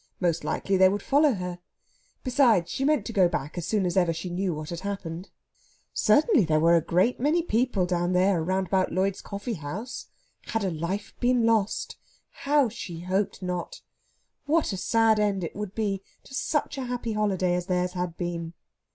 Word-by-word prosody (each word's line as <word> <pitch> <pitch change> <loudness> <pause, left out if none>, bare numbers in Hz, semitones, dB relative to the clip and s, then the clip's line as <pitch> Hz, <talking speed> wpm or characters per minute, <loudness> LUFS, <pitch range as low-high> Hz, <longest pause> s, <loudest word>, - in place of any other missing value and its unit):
Most 170 -3 0
likely 195 -1 0
they 185 0 +6
would 200 +1 -2
follow 290 0 +4
her. 180 -2 -5 0.6
Besides, 240 -9 +3
she 270 - -2
meant 290 -7 +2
to 230 - -5
go 185 -4 +4
back 145 -3 -4
as 175 -2 -4
soon 210 -3 +1
as 175 - -1
ever 175 -3 +3
she 165 +2 -5
knew 185 +1 -1
what 155 0 -5
had 170 - -4
happened. 190 -2 -5 0.6
Certainly 330 - +4
there 155 -1 +2
were 170 +2 +5
a 165 - +4
great 180 +9 +1
many 305 +6 +2
people 235 - +1
down 175 0 0
there 185 -1 +3
round 190 +3 0
about 185 0 +1
Lloyd's 190 +2 0
Coffeehouse! 200 - -6 0.4
Had 225 -2 -1
a 190 - 0
life 170 +5 -4
been 245 -1 +2
lost? 220 -3 0 0.3
How 285 -1 +2
she 180 -7 -7
hoped 190 +2 -1
not! 180 - -4 0.7
What 310 -6 +2
a - - -3
sad 225 +2 +3
end 200 -3 +1
it 165 - -5
would 210 -1 -5
be 200 -3 -1 0.2
to - - -15
such 290 0 -1
a 260 - -3
happy 245 -2 -3
holiday 195 -4 +1
as 180 0 -2
theirs 180 -1 0
had 180 -2 -4
been! 170 -2 -4
190 Hz, 185 wpm, -26 LUFS, 175-225 Hz, 0.7 s, they